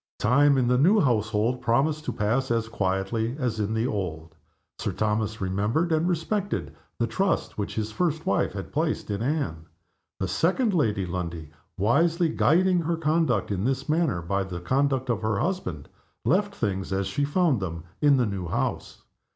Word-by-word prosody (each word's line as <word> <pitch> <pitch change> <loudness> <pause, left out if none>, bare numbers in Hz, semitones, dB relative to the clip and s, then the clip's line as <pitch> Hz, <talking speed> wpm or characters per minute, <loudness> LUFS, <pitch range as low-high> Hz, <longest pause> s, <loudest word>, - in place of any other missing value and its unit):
Time, 140 +5 +4
in 125 -2 +2
the 125 0 +3
new 195 +10 +5
household, 115 - +1
promised 140 +6 +1
to - - -1
pass 125 +6 0
as 115 -1 0
quietly 105 +3 -1
as 125 -6 -2
in 105 +1 -1
the 110 +1 +1
old. 80 - -4 0.5
Sir - - -2
Thomas 110 0 -1
remembered 105 - 0
and 160 +2 +2
respected 185 +4 -2 0.2
the 120 - +1
trust 190 - -1
which 100 - -4
his 110 0 -2
first 160 +3 -1
wife 100 - +1
had 100 -1 -7
placed 155 -7 -1
in 100 +1 -2
Anne. 115 - -2 0.5
The 95 - -1
second 190 - +1
Lady 105 - +1
Lundie, 85 -3 -5 0.3
wisely 160 - +2
guiding 180 +4 +3
her 165 +1 -1
conduct 155 - +1
in 95 -1 -1
this 135 +3 -1
matter 155 - +1
by 100 +3 0
the 90 -2 -6
conduct 135 +6 0
of 110 -2 -2
her 110 -2 0
husband, 100 - -2 0.4
left 200 +4 +2
things 95 - -2
as 95 0 0
she 100 +10 -1
found 145 - +2
them 85 -4 -5 0.2
in 145 -2 +5
the 125 - +2
new 95 -4 -3
house. - - -3
120 Hz, 175 wpm, -26 LUFS, 100-155 Hz, 0.5 s, new